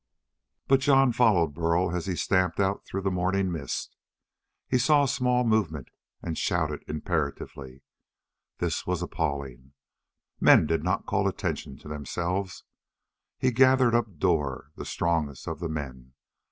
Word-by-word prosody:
But 135 Hz, 0 st, +5 dB
Jon 135 Hz, -1 st, +4 dB
followed 100 Hz, -11 st, +3 dB
Burl 85 Hz, +2 st, 0 dB
as 90 Hz, 0 st, -3 dB
he 95 Hz, -, -1 dB
stamped 90 Hz, -1 st, +1 dB
on 100 Hz, 0 st, +1 dB
through 95 Hz, 0 st, -6 dB
the 95 Hz, -, 0 dB
morning 95 Hz, +1 st, 0 dB
mist. 75 Hz, -6 st, -4 dB, 0.7 s
He 125 Hz, -, +2 dB
saw 145 Hz, +3 st, +4 dB
a -, -, +1 dB
small 125 Hz, -1 st, +1 dB
movement 100 Hz, -, 0 dB, 0.3 s
and 85 Hz, -2 st, -3 dB
shouted 80 Hz, -4 st, -1 dB
imperatively. 70 Hz, -4 st, -4 dB, 0.7 s
This 85 Hz, -2 st, -2 dB
was 90 Hz, -1 st, -1 dB
appalling! 70 Hz, -6 st, -4 dB, 0.7 s
Men -, -, +6 dB
did 80 Hz, 0 st, 0 dB
not 90 Hz, +1 st, -1 dB
call -, -, +1 dB
attention 65 Hz, -, -3 dB
to -, -, -14 dB
themselves! 85 Hz, +6 st, -3 dB, 0.7 s
He 130 Hz, -, +1 dB
gathered 130 Hz, 0 st, +4 dB
up 110 Hz, -7 st, 0 dB
Dor, 75 Hz, -5 st, 0 dB
the -, -, -7 dB
strongest 80 Hz, -5 st, -2 dB
of 80 Hz, -2 st, -4 dB
the 85 Hz, -1 st, -3 dB
men. 65 Hz, -5 st, -6 dB
85 Hz, 140 wpm, -27 LUFS, 75-100 Hz, 0.7 s, Men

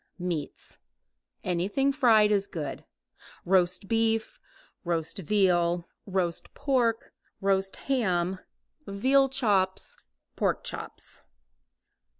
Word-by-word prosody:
Meats. 175 Hz, -5 st, -4 dB, 0.6 s
Anything 200 Hz, +11 st, +1 dB
fried 225 Hz, -7 st, +5 dB
is 200 Hz, -1 st, +2 dB
good. 150 Hz, -5 st, -6 dB, 0.6 s
Roast 185 Hz, +1 st, +2 dB
beef, 225 Hz, -, 0 dB, 0.4 s
roast 170 Hz, +2 st, -2 dB
veal, 175 Hz, -2 st, +2 dB, 0.2 s
roast 185 Hz, -3 st, -2 dB
pork, 240 Hz, -5 st, 0 dB, 0.3 s
roast 195 Hz, -1 st, +1 dB
ham, 190 Hz, -8 st, 0 dB, 0.5 s
veal 265 Hz, +7 st, +3 dB
chops, 195 Hz, -7 st, +1 dB, 0.4 s
pork -, -, 0 dB
chops. -, -, -7 dB
195 Hz, 85 wpm, -28 LUFS, 175-225 Hz, 0.6 s, fried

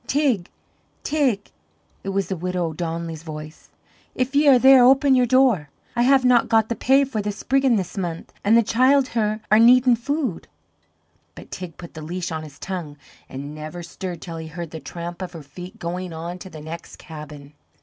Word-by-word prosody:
"Teig, 265 Hz, -11 st, +1 dB, 0.6 s
Teig!" 275 Hz, -9 st, 0 dB, 0.5 s
It 195 Hz, -, -4 dB
was 195 Hz, -2 st, -1 dB
the 190 Hz, -, -2 dB
widow 180 Hz, 0 st, -2 dB
O'Donnelly's 165 Hz, -1 st, -4 dB
voice. 155 Hz, -1 st, -9 dB, 0.5 s
"If 255 Hz, +2 st, -1 dB
ye 290 Hz, +1 st, +4 dB
are 270 Hz, -2 st, +8 dB
there, 265 Hz, 0 st, +7 dB
open 270 Hz, +2 st, +5 dB
your 250 Hz, -1 st, +4 dB
door. 245 Hz, -, +3 dB, 0.3 s
I 240 Hz, -, +1 dB
have 260 Hz, +1 st, +4 dB
not 250 Hz, -2 st, +4 dB
got 225 Hz, -2 st, +3 dB
the 235 Hz, -, -1 dB
pay 270 Hz, +5 st, +4 dB
for 255 Hz, -6 st, -3 dB
the 205 Hz, 0 st, -2 dB
spriggin' 265 Hz, +4 st, +1 dB
this 190 Hz, -4 st, -3 dB
month, 170 Hz, -3 st, -5 dB
an' 210 Hz, +3 st, +4 dB
the 235 Hz, -, +5 dB
childher 235 Hz, -3 st, +2 dB
are 215 Hz, -, +7 dB
needin' 245 Hz, +1 st, +6 dB
food." 260 Hz, -, -3 dB, 0.9 s
But -, -, -12 dB
Teig 180 Hz, -4 st, -7 dB
put 170 Hz, -, -11 dB
the 155 Hz, -, -8 dB
leash 175 Hz, +3 st, -4 dB
on 160 Hz, -1 st, -3 dB
his 150 Hz, -2 st, -11 dB
tongue, 170 Hz, -6 st, -6 dB, 0.3 s
and 140 Hz, +2 st, -7 dB
never 155 Hz, +3 st, -7 dB
stirred 175 Hz, 0 st, -7 dB
till 165 Hz, -2 st, -7 dB
he 160 Hz, 0 st, -7 dB
heard 165 Hz, 0 st, -7 dB
the 160 Hz, -, -6 dB
tramp 170 Hz, +2 st, -7 dB
of 180 Hz, -1 st, -6 dB
her 165 Hz, -3 st, -9 dB
feet 175 Hz, +6 st, -11 dB
going 180 Hz, +1 st, -5 dB
on 170 Hz, +3 st, -6 dB
to 190 Hz, -, -9 dB
the 155 Hz, -3 st, -10 dB
next 160 Hz, +2 st, -8 dB
cabin. 150 Hz, -2 st, -11 dB
185 Hz, 190 wpm, -22 LUFS, 165-250 Hz, 0.9 s, are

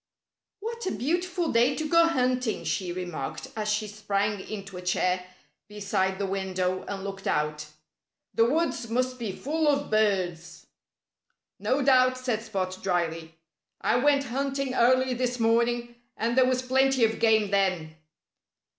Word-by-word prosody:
"What 465 Hz, 0 st, -5 dB
a -, -, 0 dB
beautiful 350 Hz, +5 st, -1 dB
day 240 Hz, +4 st, +3 dB
to 315 Hz, -, -2 dB
go 335 Hz, +1 st, +5 dB
hunting!" 255 Hz, -6 st, 0 dB
she 180 Hz, -2 st, -2 dB
remarked 175 Hz, -6 st, -5 dB
as 215 Hz, -1 st, -1 dB
she 215 Hz, 0 st, -1 dB
sprang 205 Hz, 0 st, -1 dB
into 200 Hz, -1 st, -7 dB
a 180 Hz, -, -6 dB
chair 180 Hz, 0 st, 0 dB, 0.4 s
beside 200 Hz, -2 st, -1 dB
the 200 Hz, -, -1 dB
window 185 Hz, -1 st, -2 dB
and 195 Hz, -1 st, -5 dB
looked 195 Hz, -1 st, -6 dB
out. 150 Hz, 0 st, -1 dB, 0.7 s
"The 230 Hz, +1 st, +3 dB
woods 290 Hz, -6 st, 0 dB
must 255 Hz, +2 st, -1 dB
be 225 Hz, -4 st, -3 dB
full 305 Hz, +9 st, -1 dB
of 285 Hz, -1 st, +1 dB
birds." 185 Hz, -6 st, 0 dB, 0.9 s
"No 270 Hz, +2 st, +1 dB
doubt!" 255 Hz, -1 st, +4 dB
said 250 Hz, -4 st, -2 dB
Spot 190 Hz, -5 st, -3 dB
dryly. 165 Hz, -3 st, -2 dB, 0.4 s
"I -, -, +2 dB
went 280 Hz, +2 st, +3 dB
hunting 275 Hz, +1 st, -2 dB
early 255 Hz, +1 st, +3 dB
this 250 Hz, 0 st, -2 dB
morning; 235 Hz, +1 st, +1 dB, 0.2 s
and 230 Hz, +2 st, 0 dB
there 260 Hz, -1 st, +5 dB
was 255 Hz, 0 st, 0 dB
plenty 265 Hz, -1 st, +3 dB
of 225 Hz, 0 st, -2 dB
game 220 Hz, -3 st, +3 dB
then." 185 Hz, -5 st, 0 dB
225 Hz, 145 wpm, -27 LUFS, 190-255 Hz, 0.9 s, go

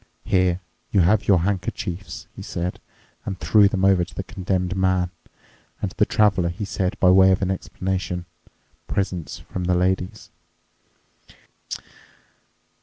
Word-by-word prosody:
"Here 90 Hz, -1 st, +2 dB, 0.3 s
you 100 Hz, -, +4 dB
have 95 Hz, +4 st, +3 dB
your 95 Hz, -4 st, +5 dB
handkerchiefs," 95 Hz, -1 st, -3 dB
he -, -, -8 dB
said 90 Hz, +1 st, -4 dB, 0.4 s
and 95 Hz, -1 st, -5 dB
threw 105 Hz, -2 st, +5 dB
them 95 Hz, -1 st, 0 dB
over 95 Hz, -2 st, +5 dB
to 85 Hz, -, -10 dB
the 95 Hz, -, -3 dB
Condemned 95 Hz, -1 st, -2 dB
Man. 95 Hz, -2 st, +1 dB, 0.7 s
And -, -, -2 dB
to -, -, -18 dB
the -, -, +4 dB
Traveler 100 Hz, -5 st, +3 dB
he 90 Hz, +5 st, -4 dB
said 95 Hz, -1 st, -2 dB
by 90 Hz, -, +6 dB
way 95 Hz, 0 st, +7 dB
of 95 Hz, +1 st, +1 dB
an 95 Hz, -, +1 dB
explanation, 95 Hz, -1 st, -3 dB, 0.6 s
"Presents 90 Hz, -5 st, -2 dB
from 90 Hz, -1 st, -5 dB
the 90 Hz, 0 st, +2 dB
ladies." 90 Hz, 0 st, -1 dB
95 Hz, 140 wpm, -23 LUFS, 90-95 Hz, 0.7 s, way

